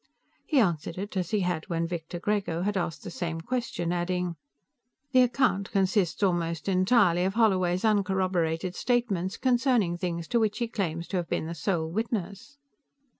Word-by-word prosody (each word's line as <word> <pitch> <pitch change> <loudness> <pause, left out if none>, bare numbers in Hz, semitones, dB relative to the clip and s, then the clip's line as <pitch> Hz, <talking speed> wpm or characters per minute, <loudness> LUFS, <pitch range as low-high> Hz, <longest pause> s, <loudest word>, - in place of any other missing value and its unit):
He 300 - +1
answered 170 -6 0
it 200 +2 -5
as 180 -2 -1
he 210 -2 +1
had 175 -3 -2
when 165 -1 0
Victor 175 0 -5
Grego 195 -4 -1
had 205 +1 0
asked 175 -3 -2
the 180 - -6
same 165 -2 -3
question, 205 -4 -2
adding: 180 0 -1 0.8
"The 255 -2 +6
account 245 -6 +2
consists 195 -1 +1
almost 170 -3 0
entirely 185 -2 +3
of 190 +2 -1
Holloway's 185 -4 +2
uncorroborated 185 -4 +1
statements 205 -6 0
concerning 245 -8 +2
things 170 -2 -3
to 240 - +2
which 215 -2 +1
he 235 - -1
claims 170 -7 -3
to 190 - -1
have 175 -2 -3
been - - -1
the 165 - -4
sole 165 0 -1
witness." 205 - -4
185 Hz, 165 wpm, -28 LUFS, 170-210 Hz, 0.8 s, The